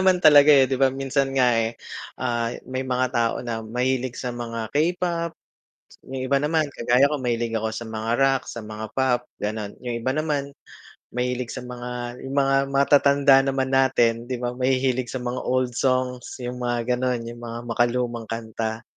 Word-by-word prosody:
naman 185 -1 +4
talaga, 150 -2 +8
eh, 135 -2 +7
'di 135 - 0
ba. 135 - +6
Minsan 135 0 -1
nga, 125 -2 +4
eh, 115 0 0 0.4
ah, 120 -2 0 0.2
may 130 0 -2
mga 130 0 +1
tao 115 -1 +1
na 115 -2 -3
mahilig 125 +2 -1
sa 125 -2 -3
mga 115 -2 -5
K-pop, 170 +1 0 0.8
yung 130 -1 -4
iba 140 +1 +2
naman 155 +1 +1
kagaya 125 +4 +3
ko 145 -3 -2
mahilig 120 -2 -1
ako 110 0 -1
sa 115 - -5
mga 110 0 -4
rock, 135 -1 +3
sa 115 -2 -7
mga 110 0 -6
pop 130 -2 +2 0.2
ganon, 105 -1 -3
yung 120 -1 -5
iba 130 - -1
naman 145 -1 -1 0.7
mahilig 125 0 -2
sa 130 - -6
mga, 125 0 -6
yung 135 - -5
mga 135 -1 +3
matatanda 140 0 +5
naman 135 -1 0
natin 120 -3 +2
'di 125 -1 -3
ba 120 - 0
mahihilig 130 0 +1
sa 130 - -4
mga 125 +1 -3
old 130 0 0
songs, 130 -1 -1
yung 125 0 -4
mga 120 -1 -1 0.2
ganon, 125 -2 0
yung 120 - -10
mga 115 0 -5
makalumang 120 0 0
kanta 110 0 -4
125 Hz, 175 wpm, -24 LUFS, 120-135 Hz, 0.8 s, talaga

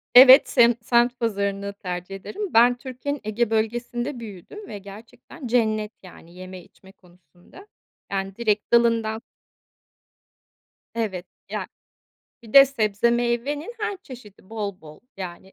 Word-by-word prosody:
Evet, 260 +2 +10
semt 235 -2 +3
semt 240 +1 +2
pazarını 200 -3 -2
tercih 180 -1 -6
ederim. 390 - -6
Ben 245 +2 +5
Türkiye'nin 265 +2 -5
Ege 215 +2 -1
Bölgesi'nde 240 +4 -2
büyüdüm 230 - -10
ve 210 - -7
gerçekten 220 - -12
cennet, 220 -3 +1
yani, 175 -2 -15
yeme 185 0 -10
içme 190 +2 -20
konusunda. 180 - -20 0.4
Yani, 195 0 -3
direkt 215 -1 -1
dalından 230 -2 +2 1.7
Evet. 195 -6 -3 0.2
Ya, - - -4 0.8
bir 225 - -14
de 275 0 +10
sebze 225 -3 0
meyvenin 240 - -1
her 425 -1 -2
çeşidi 210 -7 -14
bol 205 -4 -5
bol, 155 -1 -14 0.2
yani. 190 0 -8
225 Hz, 125 wpm, -23 LUFS, 195-245 Hz, 1.7 s, Evet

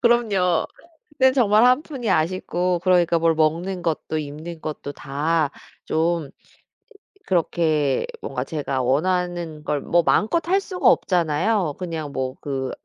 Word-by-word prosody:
그럼요. 205 -8 +2 0.4
그땐 265 -4 +3
정말 220 -4 +4
1 255 +4 +4
푼이 265 -8 -5
아쉽고 180 +1 0
그러니까 175 -2 +3
뭘 165 0 +3
먹는 170 +4 0
것도 160 -1 -2
입는 155 +3 -7
것도 150 -2 -5
다 150 +3 -1 0.4
좀 165 -2 0 1.0
그렇게 155 -5 +1 0.2
뭔가 - - -3
제가 140 -5 -3
원하는 170 +3 -1
걸 150 -2 -1
뭐 170 0 +2
마음껏 320 - +2
할 385 +2 +3
수가 370 -2 +2
없잖아요. 175 0 +1
그냥 160 -5 -4
뭐 130 -1 -3
그 135 -2 -3
170 Hz, 250 characters per minute, -22 LUFS, 155-190 Hz, 1.0 s, 정말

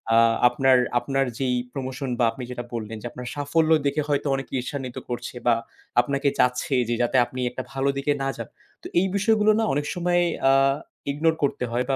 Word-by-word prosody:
আ - - +6 0.3
আপনার, 130 +1 +4 0.2
আপনার 135 +1 0
যেই 130 -2 +1 0.2
promotion 130 0 -4
বা 120 - +4
আপনি 130 - -8
যেটা 120 -1 -5
বললেন 110 -1 -4
যে 120 - -5
আপনার 125 0 -8
সাফল্য 145 +3 +1 0.2
দেখে 145 +2 +1
হয়তো 145 0 0
অনেকে 135 0 -6
ঈর্ষান্বিত 130 0 -5
করছে 120 +1 -5
বা 120 - +6 0.5
আপনাকে 140 +1 -1
চাচ্ছে 125 +2 +2
যে 120 - +1
যাতে 120 +2 +2
আপনি 125 +1 -8
একটা 125 +1 -6
ভালো 135 +1 0
দিকে 140 +1 +1
না - - 0
যান। - - -6 0.3
তো - - -6
এই 190 - +2
বিষয়গুলো 215 0 +3
না - - +2
অনেক 145 +1 -1
সময় 175 0 +2 0.3
আ - - +5 0.6
ignore 160 +3 +1
করতে 140 - 0
হয় 120 +2 0
বা 135 - +2
135 Hz, 195 wpm, -24 LUFS, 125-145 Hz, 0.6 s, আ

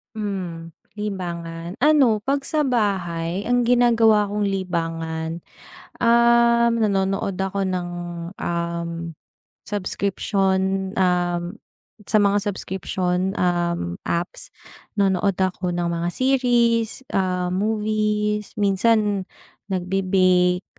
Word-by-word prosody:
Hmm, 185 -6 -4 0.2
libangan? 175 -5 -5
Ano, 275 -7 +4
'pag 275 +5 -1
sa 305 +1 0
bahay, 190 -5 -1
ang 245 0 +3
ginagawa 230 -4 +4
kong 210 0 -1
libangan, 165 -4 -3 0.6
um, 235 0 +4
nanonood 195 -2 0
ako 195 +1 -2
ng, 180 -1 -2 0.5
um, 170 0 -2 0.8
subscription, 195 -1 0
um, 175 +1 0 0.5
sa 215 - +4
mga 205 0 +3
subscription, 190 -1 -2
um, 170 - -1
apps. 175 - -2 0.5
Nanonood 195 -1 +2
ako 185 -1 -1
ng 175 0 -1
mga 170 0 -1
series, 240 0 +1
ah, 180 -1 0
movies, 210 +1 -1
minsan 205 -1 +2 0.4
nagbe-bake, 185 -1 +2
195 Hz, 90 wpm, -22 LUFS, 180-215 Hz, 0.8 s, Ano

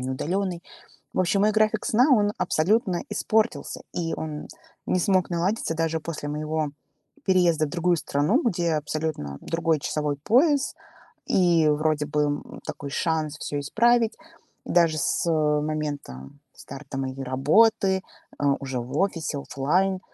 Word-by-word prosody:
не 130 +1 -3
удалённой. 175 +5 -2 0.5
В - - +2
общем, 185 +2 +2
мой 210 +1 +3
график 215 0 +2
сна, 250 +7 +4
он 205 -3 +3
абсолютно 185 +2 +1
испортился, 220 +1 0
и 165 -2 -2
он 150 -1 -5 0.4
не 185 - +1
смог 185 0 +2
наладиться 175 +1 -1
даже 160 0 -1
после 150 -2 -5
моего 155 +1 -2 0.6
переезда 175 -5 +3
в - - -8
другую 175 +1 +1
страну, 155 - +1
где 175 -7 0
абсолютно 150 - -3
другой 165 -2 0
часовой 150 0 -2
пояс 275 - +2 0.5
и 170 -4 +3
вроде 150 0 +1
бы, 150 0 0
м, 145 0 -3
такой 140 - -6
шанс 155 0 -1
всё 145 - -4
исправить, 230 - +2 0.5
даже 165 -3 +3
с, 155 - 0
э, 150 -2 +2
момента 145 - -4 0.2
старта 135 - -8
моей 135 0 -4
работы, 190 - +3 0.4
э, - - -1 0.2
уже 135 -2 -3
в 125 +4 -6
офисе, 165 -6 -1
офлайн, 180 +8 0
160 Hz, 140 wpm, -25 LUFS, 150-190 Hz, 0.6 s, сна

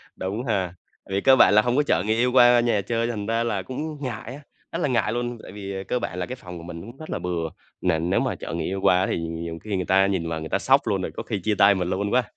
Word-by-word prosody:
Đúng 100 +6 -3
ha. 95 -7 -1 0.4
Vì 100 +1 0
cơ 135 -1 +6
bản 115 - +6
là 105 - +7
hông 120 +2 0
có 145 - +4
chở 145 - +1
người 110 +1 +2
yêu 125 +2 +2
qua 120 -1 +7
nhà 115 -4 +2
chơi 115 +3 -1
thành 110 -4 -3
ra 115 +2 0
là 110 -5 -1
cũng 125 +7 -7 0.2
ngại 125 -2 -5
á, 145 - -11 0.3
rất - - -3
là - - +2
ngại 120 -4 +1
luôn. 120 0 -2
Tại - - -10
vì, 100 -1 -6
ờ, 95 - -4
cơ 125 - 0
bản 90 - -4
là 90 - -1
cái 130 - -6
phòng 90 -8 -10
của 85 - -9
mình 85 -1 -8
cũng 120 +5 -11
rất 155 - -10
là - - -2
bừa. 85 -2 -2 0.3
Nền 85 -1 +1
nếu - - +2
mà - - -1
chở - - -7
người 85 - -2
yêu 95 +1 -2
qua 90 +1 +4
thì - - -1
nhiều 85 0 -5
khi 105 -2 -3
người 90 -1 -1
ta 95 +1 +4
nhìn 90 -4 -1
vào 80 -1 -2
người 80 0 -6
ta - - +1
sốc - - +4
luôn, - - +1
rồi - - -3
có - - -3
khi 105 - -3
chia 105 +3 0
tay 100 +1 +6
mình 90 -2 -1
luôn 100 +2 -1
quá. 125 0 +3
100 Hz, 310 wpm, -24 LUFS, 90-120 Hz, 0.4 s, là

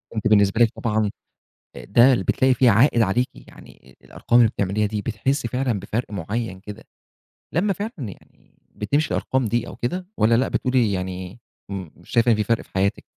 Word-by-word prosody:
أنتِ 110 0 0
بالنسبة 105 +1 +3
لِك 115 - +6
طبعًا 110 -3 -1 0.6
آآ، - - -9
ده 120 +6 +5
بتلاقي 130 +6 +2
فيه 125 0 +4
عائد 115 +3 +4
عليكِ، 115 +5 +1
يعني - - -17
الأرقام 120 - +1
اللي 115 -3 +5
بتعمليها 100 +2 -1
دي 105 0 -3
بتحسي 120 +5 -1
فعلًا 125 -3 -1
بفَرق 105 +4 -4
معين 100 +1 -4
كده، 105 +1 -10 0.7
لمّا 195 +5 +1
فعلًا 205 +5 -5
يعني 105 -8 -11 0.2
بتمشي 140 +10 0
الأرقام 130 -1 0
دي 120 +2 -1
أو - - -9
كده، 180 +10 -4
والّا 115 +2 +4
لأ، 130 - +1
بتقولي 125 -4 +1
يعني 95 +2 -5 0.3
م 95 -3 -5
مش - - -20
شايفة 120 0 +3
إن 110 - +4
في 105 - 0
فَرق 115 +2 0
في - - -25
حياتِك؟ 95 +1 0
115 Hz, 180 wpm, -22 LUFS, 100-125 Hz, 0.7 s, لِك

